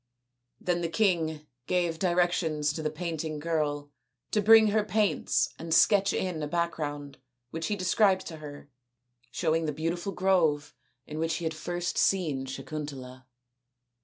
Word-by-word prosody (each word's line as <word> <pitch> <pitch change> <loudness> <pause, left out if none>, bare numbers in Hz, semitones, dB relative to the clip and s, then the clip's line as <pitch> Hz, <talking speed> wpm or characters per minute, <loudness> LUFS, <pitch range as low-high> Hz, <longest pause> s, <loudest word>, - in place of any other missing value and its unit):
Then 175 -1 -1
the 170 - -1
king 165 -5 0 0.2
gave 175 -3 0
directions 175 -4 +1
to 160 - -4
the 155 - -1
painting 160 -1 -4
girl 150 -2 -2 0.4
to 210 - +2
bring 220 +1 +7
her 215 0 +2
paints 210 0 +1
and 165 0 -7
sketch 200 +4 +5
in 180 -4 -2
a 150 - -2
background 145 -4 -3 0.3
which 165 0 -3
he 210 - 0
described 190 0 +2
to 160 - -7
her, 145 -1 -10 0.6
showing 165 -1 0
the - - 0
beautiful 165 +5 -3
grove 170 -6 +1 0.3
in 155 +1 -6
which 165 0 0
he 170 - -5
had 160 - -1
first 175 +2 -3
seen 150 -9 +1
Sakuntala. 130 -2 -7
165 Hz, 145 wpm, -28 LUFS, 150-180 Hz, 0.6 s, bring